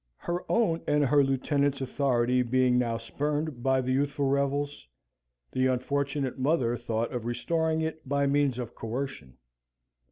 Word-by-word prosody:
Her 175 +1 -3
own 190 -8 +2
and 150 -1 +3
her 145 +1 +4
lieutenant's 140 +1 +1
authority 125 -2 +1
being 125 0 +3
now 115 -2 0
spurned 145 +3 -3
by 130 +1 +2
the 130 0 -2
youthful 140 +1 0
rebels, 140 - -1 0.6
the 130 0 +2
unfortunate 135 +1 -1
mother 130 -4 +2
thought 115 -1 -2
of 120 -2 -4
restoring 160 +6 0
it 160 -3 -4
by 140 0 +2
means 140 -2 +2
of 120 -2 -5
coercion. 115 - -5
135 Hz, 140 wpm, -28 LUFS, 125-145 Hz, 0.6 s, her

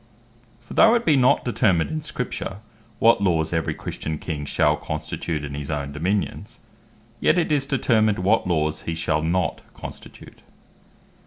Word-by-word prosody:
For 120 - -11
though 225 +1 +6
it 235 - 0
be 155 - +5
not 125 -2 +3
determined 95 -9 +2
in 155 0 -2
Scripture, 125 -9 -4 0.4
what 115 -2 +4
Laws 80 -4 +1
every 80 -1 -1
Christian 80 0 -5
King 75 -2 -5
shall 75 +1 +2
constitute 75 +1 -4
in 70 - -7
his 70 -1 -5
own 70 -2 -3
Dominions; 90 +8 -2 0.6
yet 170 - +3
it 170 -3 +1
is 140 -2 +1
determined 110 -6 +2
what 95 +3 +2
laws 80 -2 0
he 80 - -1
shall 80 -1 0
not 85 0 0
constitute. - - -11
90 Hz, 155 wpm, -23 LUFS, 75-120 Hz, 0.6 s, though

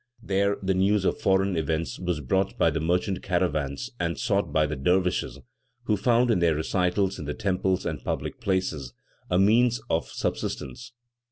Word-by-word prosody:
There 100 +1 +1
the 95 0 +1
news 95 +1 +2
of - - 0
foreign 95 0 +2
events 80 +1 -2
was 90 -4 -2
brought 95 +8 0
by 80 - +3
the 80 - -2
merchant 90 +4 0
caravans 85 - -1
and 85 -3 -1
sought - - 0
by 75 0 +3
the 75 0 -3
dervishes, 90 +6 0 0.5
who 105 - +1
found, 120 +4 +3
in 105 - +2
their 85 -2 +3
recitals 90 +4 0
in 75 - -5
the 75 - -3
temples 95 -1 0
and 75 -6 -3
public - - -4
places, 80 -10 -2 0.3
a 90 - +2
means 115 +5 +4
of 80 - 0
subsistence. 110 - -4
90 Hz, 170 wpm, -26 LUFS, 80-100 Hz, 0.5 s, means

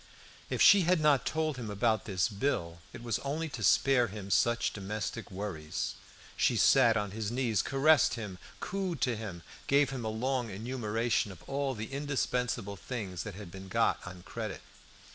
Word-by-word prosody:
If - - +2
she 200 - +8
had 180 0 +3
not 150 -3 +3
told 155 -3 -1
him 115 -4 -5
about 110 +2 +1
this 95 -4 +1
bill, 100 -7 -2
it 120 - -10
was 115 -2 -1
only 155 +4 -3
to 130 -5 -7
spare 125 +6 +4
him 100 -1 -7
such 120 +3 +2
domestic 105 +1 -4
worries; 95 -6 -4 0.4
she - - +2
sat 120 -4 +5
on 105 -2 -2
his 105 0 -3
knees, 120 -3 +1
caressed 145 +2 +4
him, 105 -6 -6 0.2
cooed 185 -4 -3
to 125 -2 +2
him, 100 -6 -7 0.2
gave 140 0 +4
him 130 -3 -4
a 110 - -1
long 125 +2 -1
enumeration 115 +1 -1
of 95 - -13
all 140 -1 -2
the 110 +4 -6
indispensable 125 -7 -1
things 95 -4 -5
that 105 -4 -6
had 100 -3 -9
been 95 +1 -9
got 95 - +2
on 90 0 -9
credit. 110 -1 -5
115 Hz, 175 wpm, -31 LUFS, 100-135 Hz, 0.4 s, she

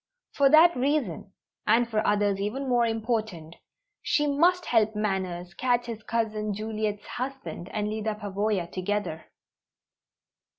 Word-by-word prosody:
For 280 -1 +4
that 320 +4 +7
reason, 250 - -1 0.4
and 230 +2 +4
for 220 -2 0
others 205 -1 +2
even 240 +8 -3
more 240 -2 +3
important, 220 -8 -3 0.4
she 295 - +1
must 345 +5 +3
help 220 -2 +2
Manners 185 -4 -2
catch 245 +3 +1
his 230 -2 -6
cousin 215 -2 -2
Juliet's 215 -1 -3
husband 260 -8 -6
and 210 -1 -2
Lyda 215 0 -2
Pavoya 205 -2 -1
together. 185 -3 -3
215 Hz, 125 wpm, -27 LUFS, 205-245 Hz, 0.4 s, that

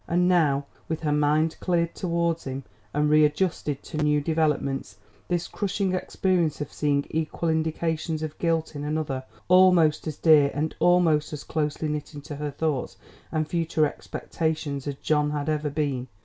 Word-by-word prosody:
And 180 +1 +2
now, 150 -6 +3 0.2
with 160 -1 -2
her 150 -2 0
mind 150 +2 +2
cleared 170 -2 0
towards 170 -2 -1
him 135 0 -4 0.3
and 150 +1 +1
readjusted 150 -1 +2
to 155 - -7
new 150 -1 +2
developments, 150 -3 -1 0.3
this 175 -1 -1
crushing 195 -2 -1
experience 180 -3 0
of 145 - -5
seeing 145 -1 +1
equal 160 +1 -1
indications 160 0 -1
of 155 -1 -6
guilt 165 -2 0
in 145 - -4
another 150 -3 -2 0.2
almost 180 -4 +5
as 155 - -4
dear 150 -3 +6
and 155 +2 -1
almost 165 -4 +3
as 150 - -5
closely 155 0 -2
knit 150 0 -4
into 145 0 -7
her 150 0 -3
thoughts 145 -2 -2 0.3
and 155 -1 0
future 165 -2 +1
expectations 150 -2 -3
as 140 - -2
John 150 +1 +1
had 145 0 -3
ever 150 -1 0
been. 140 -4 -2
155 Hz, 160 wpm, -26 LUFS, 145-165 Hz, 0.3 s, dear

